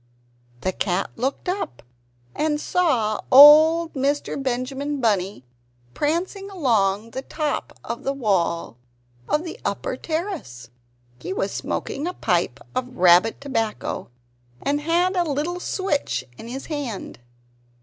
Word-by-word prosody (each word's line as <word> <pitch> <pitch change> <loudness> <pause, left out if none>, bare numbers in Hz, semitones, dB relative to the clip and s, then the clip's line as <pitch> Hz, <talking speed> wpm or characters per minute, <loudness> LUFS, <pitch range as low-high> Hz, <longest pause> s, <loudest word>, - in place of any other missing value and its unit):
The 185 - 0
cat 185 0 -1
looked 265 +8 -3
up 360 - -3 0.5
and 300 -1 0
saw 250 -13 +1
old 310 +4 +8
Mr. 280 +1 -1
Benjamin 270 +3 -2
Bunny 200 - 0 0.5
prancing 365 +6 -1
along 225 - +1
the 265 - -4
top 300 +1 -3
of 235 - -5
the 275 - -1
wall 185 - 0 0.5
of 300 - +1
the 335 - -7
upper 200 +5 -2
terrace. 315 - -5 0.5
He - - -4
was - - -1
smoking 290 +5 -3
a 360 - -4
pipe - - 0
of 255 0 -4
rabbit 180 +5 +5
tobacco, 225 -6 -3 0.5
and 290 +1 0
had 345 +4 +1
a 355 - +3
little 315 +3 -2
switch 290 - -1
in 225 - -10
his 265 +3 -6
hand. 280 - -5
275 Hz, 125 wpm, -23 LUFS, 215-320 Hz, 0.5 s, old